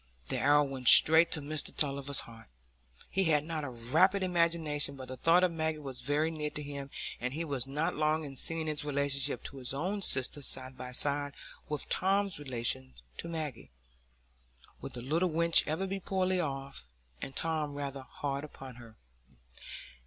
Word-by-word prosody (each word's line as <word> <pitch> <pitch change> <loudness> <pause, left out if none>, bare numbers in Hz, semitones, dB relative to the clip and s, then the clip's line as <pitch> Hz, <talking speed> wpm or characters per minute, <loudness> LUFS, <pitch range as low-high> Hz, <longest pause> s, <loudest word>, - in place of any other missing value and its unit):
The - - -1
arrow 145 +1 +4
went 135 -3 -5
straight 160 +6 +9
to 155 - -3
Mr 150 +1 -5
Tulliver's 140 -1 -1
heart. 115 -1 -14 0.6
He 190 0 0
had 150 -2 +2
not 160 -2 -4
a 145 - -4
rapid 155 +12 +3
imagination, 165 -5 +1
but 130 -1 -10
the 130 - -7
thought 170 +7 +4
of 180 - +3
Maggie 160 -1 -2
was 135 -4 -8
very 150 +4 0
near 150 -2 -3
to 150 - -5
him, 140 -1 -7 0.3
and 125 +3 -4
he 165 +2 -3
was 135 -4 -3
not 150 +4 -1
long 155 +1 0
in 135 -1 -9
seeing 165 +4 +1
his 150 -1 -1
relation 140 -1 0
to 140 - -10
his 130 0 -5
own 190 +8 -2
sister 135 -3 +1
side 130 -1 -3
by 125 0 -8
side 145 +2 +3 0.3
with 150 -2 -4
Tom's 195 -2 0
relation 115 - -2 0.2
to - - -6
Maggie. 155 -6 -6 1.1
Would - - -8
the 120 - -8
little 165 +7 0
wench 170 +1 +4
ever 160 +5 -1
be 195 +1 -4
poorly 185 -1 0
off, 135 - -4 0.3
and 135 - -7
Tom 155 -3 -2
rather 140 -1 -5
hard 140 +1 -5
upon 135 -4 -11
her? 115 -2 -14
145 Hz, 175 wpm, -31 LUFS, 135-165 Hz, 1.1 s, straight